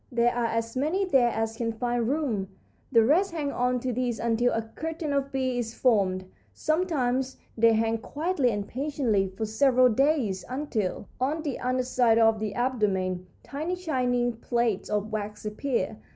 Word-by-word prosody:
There 240 0 +2
are 240 -1 0
as 230 +1 -2
many 315 +9 +1
there 265 -9 +4
as 225 0 -2
can 230 -1 -1
find 240 0 -1
room; 260 -10 -1 0.4
the 230 -1 +6
rest 340 - +3
hang 295 -4 -2
on 250 -1 0
to 255 0 -2
these 245 -1 -1
until 235 +1 +1
a 225 - -1
curtain 315 +6 -4
of 275 0 -1
bees 255 -3 -1
is 225 - -8
formed. 195 -7 +2 0.3
Sometimes 265 -6 0 0.2
they 230 0 +5
hang 225 +1 +1
quietly 295 +1 0
and 205 -2 -2
patiently 255 -7 0
for 190 +4 -4
several 255 +3 +4
days 245 -6 +1
until, 240 -9 -2
on 295 +5 -1
the 285 -5 -3
under 255 0 0
side 245 -3 +3
of 225 -1 +4
the 210 -1 -3
abdomen, 190 -7 0 0.2
tiny 315 +6 -3
shining 250 -8 0
plates 235 -3 -1
of 210 +1 -1
wax 210 0 -4
appear. 220 0 -2
245 Hz, 165 wpm, -27 LUFS, 220-275 Hz, 0.4 s, the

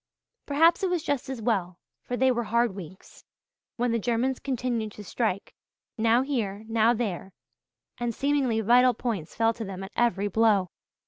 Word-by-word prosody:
Perhaps 325 +6 +4
it 380 - +1
was 355 -3 -1
just 280 -2 -2
as 255 -4 -5
well, 185 -6 0 0.2
for 245 - -4
they 260 +1 +4
were 240 -1 -1
hard 235 0 +1
weeks, 185 -1 -11 0.5
when 245 0 0
the 230 - +1
Germans 245 +4 0
continued 240 -5 -2
to 210 - -10
strike, 205 -1 -2 0.4
now 230 +2 +3
here, 220 -7 -2
now 225 0 +3
there, 200 -5 -3 0.7
and 240 -1 -1
seemingly 275 -5 +1
vital 245 +3 +5
points 215 -10 -4
fell 225 +1 +2
to 230 - -6
them 195 -2 -6
at 195 - -8
every 205 -4 +1
blow. 205 -3 +2
230 Hz, 170 wpm, -27 LUFS, 205-250 Hz, 0.7 s, vital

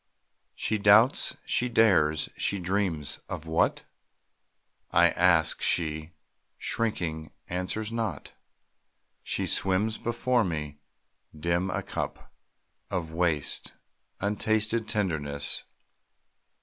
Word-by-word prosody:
She 110 - -1
doubts, 110 +6 +5
she 125 - +1
dares, 90 -10 +3
she 100 - -1
dreams 90 -5 -1
of 85 -2 -5
what? 80 0 +1 1.1
I 85 0 +5
ask; 85 -3 +3
she, 80 -1 0 0.5
shrinking, 85 -9 -2 0.2
answers 95 +5 -2
not, 115 -1 -3 0.9
She - - -2
swims 100 +4 0
before 120 +1 +1
me, 75 -5 -4 0.6
dim, 85 +3 0
a - - -2
cup - - -5 0.6
Of 80 -3 -3
waste, 80 -3 0 0.5
untasted 110 +2 0
tenderness. 75 -9 0
90 Hz, 90 wpm, -28 LUFS, 80-110 Hz, 1.1 s, doubts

